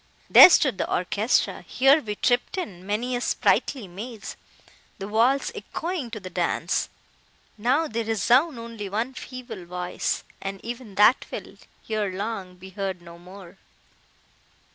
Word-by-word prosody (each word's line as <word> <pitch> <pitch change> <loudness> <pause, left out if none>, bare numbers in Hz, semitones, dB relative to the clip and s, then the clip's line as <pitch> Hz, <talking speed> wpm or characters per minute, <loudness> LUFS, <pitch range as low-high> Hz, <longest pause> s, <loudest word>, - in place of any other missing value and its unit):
There - - +11
stood 265 - +3
the - - -2
orchestra; 205 +6 0
here 275 +4 +4
we 210 -4 -4
tripped 245 - 0
in 190 - -6
many 235 +5 -1
a 245 - -2
sprightly 245 -2 +1
maze—the 200 -1 -11
walls 235 +6 +2
echoing 335 -7 -4
to 225 - -6
the 190 - -9
dance! - - -1 0.7
Now, 260 +9 +1
they 230 -2 -2
resound 240 - +2
only 230 -3 -7
one 225 +6 -2
feeble 250 -7 -8
voice—and 180 +2 -4
even 235 -3 -7
that 210 +6 +5
will, - - -7 0.3
ere 215 -3 -1
long, 195 -1 -5
be 190 +1 -12
heard 195 -2 -4
no 170 0 -12
more! 185 +1 -13
220 Hz, 135 wpm, -25 LUFS, 195-250 Hz, 0.7 s, There